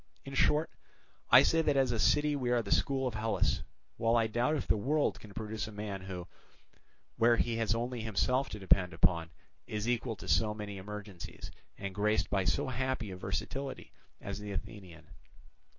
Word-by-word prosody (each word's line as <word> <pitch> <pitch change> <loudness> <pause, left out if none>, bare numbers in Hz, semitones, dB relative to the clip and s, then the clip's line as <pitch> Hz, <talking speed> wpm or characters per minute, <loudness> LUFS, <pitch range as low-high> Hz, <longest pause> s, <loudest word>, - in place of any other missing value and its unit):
"In 135 - -7
short, 150 +4 +3 0.6
I 125 +3 +9
say 165 +3 +3
that 145 -3 +2
as 135 -2 +3
a 115 - -1
city 150 +5 +3
we 125 -3 -1
are 120 -1 +2
the - - -7
school 135 -1 +2
of 125 - -1
Hellas, 110 0 0 0.4
while 115 0 +2
I 115 -1 +4
doubt 120 +7 +1
if 145 - -2
the - - +4
world 145 +8 +1
can 105 - -12
produce 110 0 -4
a - - -8
man 105 -2 -5
who, 90 -2 -6 0.9
where 115 +1 +5
he 115 -1 0
has 115 -1 +1
only 120 +1 -2
himself 125 +5 +1
to - - -6
depend 95 -2 +3
upon, 85 -1 +2 0.4
is 105 +1 -3
equal 120 -1 0
to 105 - -10
so 105 -1 +2
many 105 -2 -6
emergencies, 105 -2 -8 0.3
and 100 -1 -5
graced 105 +2 +1
by 95 -2 +1
so 85 -4 +1
happy 130 -4 -2
a - - -5
versatility, 100 +9 -4 0.3
as - - -5
the 105 0 -6
Athenian. 90 -6 -8
110 Hz, 185 wpm, -32 LUFS, 100-125 Hz, 0.9 s, I